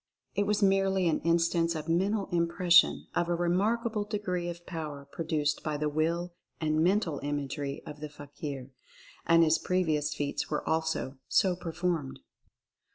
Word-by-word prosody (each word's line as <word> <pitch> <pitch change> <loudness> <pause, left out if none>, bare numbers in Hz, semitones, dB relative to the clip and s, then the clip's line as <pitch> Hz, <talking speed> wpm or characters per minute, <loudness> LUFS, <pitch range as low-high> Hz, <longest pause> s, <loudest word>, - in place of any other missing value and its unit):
It 200 0 0
was 210 0 +1
merely 195 -1 +3
an 160 - +2
instance 170 0 +2
of 155 0 -5
Mental 195 +5 +1
Im 170 -1 +2
pression 175 0 +4
of 170 - 0
a 175 - +2
remarkable 210 +6 +1
degree 190 -4 -2
of 175 0 -8
power 150 -5 -6
produced 150 -3 -1
by 155 -1 -2
the 150 0 0
Will 170 +3 -1 0.3
and 155 0 +1
Mental 180 -5 +1
Imagery 145 0 -3
of 150 - -9
the 150 0 -6
fakir; 145 -2 -7 0.6
and 165 0 +6
his 160 0 +3
previous 155 -5 0
feats 145 -1 -2
were 150 - -2
also 160 -4 -1
so 190 -4 +3
performed. 170 -4 -3
165 Hz, 155 wpm, -30 LUFS, 150-180 Hz, 0.6 s, and